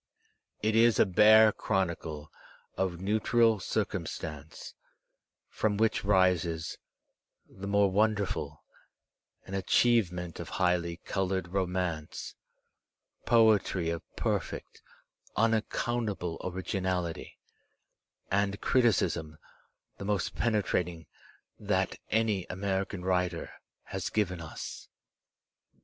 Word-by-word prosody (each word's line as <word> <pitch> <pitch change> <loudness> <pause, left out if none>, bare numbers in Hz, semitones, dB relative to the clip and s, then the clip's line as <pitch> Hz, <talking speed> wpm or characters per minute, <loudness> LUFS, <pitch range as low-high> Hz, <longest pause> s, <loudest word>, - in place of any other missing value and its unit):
It 110 0 +2
is 115 -1 +5
a - - +6
bare 110 +3 +7
chronicle 85 -7 -2 0.4
of 90 -2 -1
neutral 110 +3 +2
cir - - 0
cumstance, 75 -1 -7 0.7
from 105 -2 -1
vvLioh 110 0 +1
rises, 90 -4 +1 0.7
the 100 +1 -9
more 100 -1 +3
wonderful, 105 0 0 0.8
an 95 - -9
achieve 100 +1 +3
ment 90 -1 -6
of - - -6
highly 90 -2 +1
coloured 95 -1 -2
romance, 90 -4 -2 0.9
poetry 105 -7 +4
of 85 -1 -3
perfect, - - -3 0.6
unac 110 0 +2
countable 105 -8 -2
originality, 90 -2 -3 0.9
and 100 0 +1
criticism 95 -10 +1 0.6
the 100 - -5
most 100 -2 -1
penetrating 90 -7 0 0.5
that - - -1
any 110 -4 +1
American 95 0 -2
writer 90 -2 0 0.3
has 95 -2 -4
given 90 -5 -1
us. 80 - -8
95 Hz, 95 wpm, -30 LUFS, 90-105 Hz, 0.9 s, bare